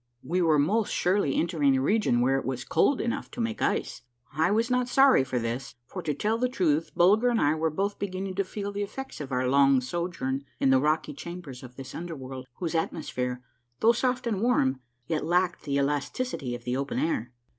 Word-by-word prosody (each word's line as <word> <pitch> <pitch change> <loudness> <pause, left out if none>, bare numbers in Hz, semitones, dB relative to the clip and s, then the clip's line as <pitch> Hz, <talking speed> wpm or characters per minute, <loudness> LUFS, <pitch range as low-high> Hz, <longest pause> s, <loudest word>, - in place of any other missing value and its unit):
We 180 +3 0
were 160 -3 +4
most 200 +10 +1
surely 180 -6 +1
entering 150 -5 +2
a - - +1
region 200 - +2
where 135 +2 +3
it - - -6
was 130 -1 -3
cold 255 - +2
enough 235 - -2
to - - -10
make 230 -1 -2
ice. - - -1 0.3
I 155 +3 +2
was 230 +4 +1
not 250 0 +2
sorry 270 - +6
for 130 -1 -3
this; 120 +2 -3
for, 185 +8 -7
to 150 -4 -2
tell 220 +8 0
the 250 +1 +1
truth, 165 - +1
Bulger 210 +8 +5
and 235 -2 +1
I 145 - +3
were 160 +1 0
both 195 +6 -2
beginning 190 -1 -3
to 200 - +2
feel 200 +1 -5
the 200 0 -4
effects 265 +1 -6
of 140 -2 -7
our 125 0 0
long 135 0 +5
sojourn 140 -1 -3 0.2
in 135 - +3
the 130 - +5
rocky 150 0 0
chambers 170 -4 -8
of 125 -1 -12
this 135 0 -9
under 170 0 -5
world, 130 -1 -8
whose 170 -3 -3
atmosphere, 125 -6 -2 0.4
though 230 - +6
soft 250 +1 0
and 210 -5 -1
warm, 135 - +2 0.3
yet 155 +1 -1
lacked 175 +2 +1
the 140 -2 0
elasticity 140 - -1
of 120 - -9
the 125 +1 -2
open 140 +1 -2
air. 125 -7 -1
160 Hz, 210 wpm, -27 LUFS, 135-200 Hz, 0.4 s, sorry